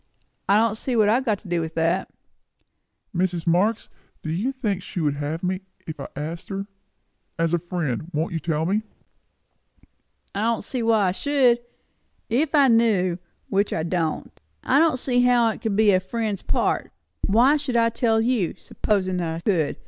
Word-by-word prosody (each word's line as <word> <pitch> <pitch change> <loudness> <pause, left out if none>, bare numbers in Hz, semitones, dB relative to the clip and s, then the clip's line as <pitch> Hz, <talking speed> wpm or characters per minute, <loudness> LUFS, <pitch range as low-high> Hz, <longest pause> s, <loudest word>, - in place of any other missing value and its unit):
I 200 - +6
don't 225 -1 +2
see 250 +2 -2
what 215 -2 +4
I - - +4
have 260 +2 0
got 215 -4 +1
to 210 - -13
do 175 -1 0
with 160 0 -5
that." 165 +3 0 1.1
"Mrs. 175 -2 0
Marx, 190 +6 +2 0.4
do 155 - -3
you 205 +11 -1
think 215 -8 -2
she 180 - -6
would 145 -3 0
have 150 +4 -4
me 185 +1 -1 0.2
if 160 -2 -7
I 135 - -5
asked 160 +4 -6
her? 195 0 -3 0.7
As 165 0 0
a 175 - +3
friend, 165 -5 -3
won't 160 +1 -2
you 165 - -1
tell 160 0 -1
me?" 200 +5 +1 1.5
"I 200 - -2
don't 230 0 0
see 255 - -3
why 220 -4 +3
I - - +1
should, 255 +2 +2 0.7
if 280 +6 +1
I 280 -2 +6
knew, 210 -7 +3 0.3
which 200 +1 +1
I 160 - -1
don't. 165 -2 -3 0.2
I 270 - +3
don't 320 -4 +3
see 245 -1 +1
how 245 -2 +4
it 220 - -10
would 220 -3 0
be 215 0 +5
a 185 - +4
friend's 210 +1 -3
part. - - 0 0.4
Why 240 +8 +5
should 285 -4 -4
I 230 0 +4
tell 225 -1 +1
you, 230 -7 0
supposin' 185 -3 -1
I 165 0 -3
could? 170 -7 0
200 Hz, 185 wpm, -24 LUFS, 170-230 Hz, 1.5 s, I